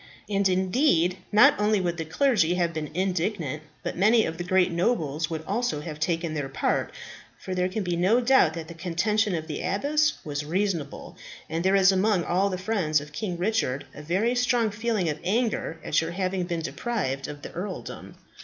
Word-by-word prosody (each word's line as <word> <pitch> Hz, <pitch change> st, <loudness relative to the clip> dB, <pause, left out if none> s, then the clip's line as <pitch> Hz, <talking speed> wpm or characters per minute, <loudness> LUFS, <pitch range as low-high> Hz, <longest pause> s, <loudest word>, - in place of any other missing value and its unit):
And 200 Hz, -1 st, +1 dB
indeed, 185 Hz, -, +2 dB
not 210 Hz, 0 st, +7 dB
only 210 Hz, 0 st, +2 dB
would 175 Hz, -2 st, -1 dB
the 165 Hz, -, -3 dB
clergy 180 Hz, -, +2 dB
have 170 Hz, -2 st, 0 dB
been 155 Hz, -2 st, -4 dB
indignant, 180 Hz, -5 st, -1 dB, 0.2 s
but -, -, -3 dB
many 215 Hz, +4 st, +4 dB
of 165 Hz, +1 st, -5 dB
the -, -, -2 dB
great 185 Hz, 0 st, +2 dB
nobles 165 Hz, -, 0 dB
would 160 Hz, -1 st, -4 dB
also 205 Hz, -6 st, -1 dB
have 150 Hz, -1 st, -7 dB
taken 165 Hz, 0 st, -1 dB
their 145 Hz, -3 st, -3 dB
part, 135 Hz, -, -1 dB, 0.5 s
for 185 Hz, -, -6 dB
there 180 Hz, 0 st, 0 dB
can 205 Hz, +2 st, -3 dB
be 175 Hz, -2 st, -1 dB
no 190 Hz, +8 st, +3 dB
doubt 240 Hz, -10 st, +4 dB
that 165 Hz, -1 st, -6 dB
the 170 Hz, -, -8 dB
contention 185 Hz, +4 st, 0 dB
of 160 Hz, -1 st, -3 dB
the 155 Hz, -2 st, -5 dB
abbess 300 Hz, +9 st, +1 dB
was 145 Hz, -1 st, -3 dB
reasonable; 170 Hz, -2 st, -3 dB, 0.3 s
and 165 Hz, +2 st, -2 dB
there 190 Hz, +1 st, +3 dB
is 195 Hz, 0 st, +6 dB
among 190 Hz, -1 st, +2 dB
all 190 Hz, +4 st, +1 dB
the 185 Hz, -, -3 dB
friends 185 Hz, -6 st, +1 dB
of 145 Hz, +1 st, -10 dB
King 180 Hz, +2 st, -3 dB
Richard 175 Hz, -, -1 dB
a -, -, -9 dB
very 190 Hz, +10 st, +1 dB
strong 245 Hz, -3 st, +2 dB
feeling 215 Hz, -3 st, -1 dB
of 150 Hz, -1 st, -2 dB
anger 210 Hz, -4 st, -1 dB
at 155 Hz, -, +2 dB
your 165 Hz, -, -3 dB
having 185 Hz, 0 st, -1 dB
been 170 Hz, -2 st, -3 dB
deprived 155 Hz, -, -3 dB
of 145 Hz, -1 st, -9 dB
the -, -, -7 dB
earldom. 190 Hz, +3 st, -7 dB
180 Hz, 195 wpm, -26 LUFS, 160-210 Hz, 0.5 s, not